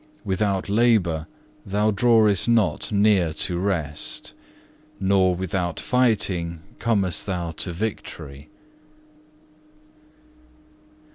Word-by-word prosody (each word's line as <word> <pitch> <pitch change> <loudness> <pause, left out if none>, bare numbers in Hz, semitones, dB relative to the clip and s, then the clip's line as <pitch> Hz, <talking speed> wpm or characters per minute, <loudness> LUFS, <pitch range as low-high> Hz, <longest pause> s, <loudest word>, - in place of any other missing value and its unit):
Without 95 0 -1
labour 100 -8 +2 0.4
thou 105 +2 0
drawest 110 -1 +3
not 115 -3 +1
near 100 -5 +3
to 85 +2 0
rest, 80 -7 -2 0.7
nor 95 -1 +2
without 90 -2 -3
fighting 95 -9 0 0.2
comest 100 -8 0
thou 90 -3 -2
to 85 +3 -3
victory." 80 -7 -6
95 Hz, 80 wpm, -23 LUFS, 85-105 Hz, 0.7 s, drawest